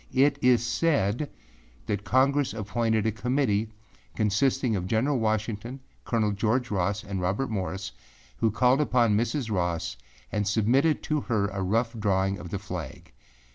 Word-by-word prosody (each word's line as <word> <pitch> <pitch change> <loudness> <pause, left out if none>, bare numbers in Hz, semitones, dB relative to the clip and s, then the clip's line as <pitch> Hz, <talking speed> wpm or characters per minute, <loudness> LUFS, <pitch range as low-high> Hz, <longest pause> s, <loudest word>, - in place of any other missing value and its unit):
It 140 +2 +4
is 125 -2 +4
said 140 -3 +1 0.6
that 100 -1 -2
Congress 135 +2 +2
appointed 110 +1 0
a 110 - +2
Committee 115 -1 0 0.5
consisting 115 +3 +1
of 90 -2 -3
General 125 +6 +1
Washington, 110 +3 -2 0.3
Col. 110 -3 +1
George 115 +4 0
Ross 100 +1 0
and 95 -1 -4
Robert 100 +9 -1
Morris, 95 -1 -3 0.5
who 115 - +2
called 125 +6 +3
upon 120 -7 +3
Mrs. 115 +2 -1
Ross 85 - -1 0.3
and 105 -1 -1
submitted 125 +9 +2
to 150 -1 0
her 105 -6 0
a 100 -1 -4
rough 115 +5 0
drawing 95 -1 +1
of 85 - -8
the 100 - -3
flag. 90 -11 -7
110 Hz, 145 wpm, -27 LUFS, 100-125 Hz, 0.6 s, It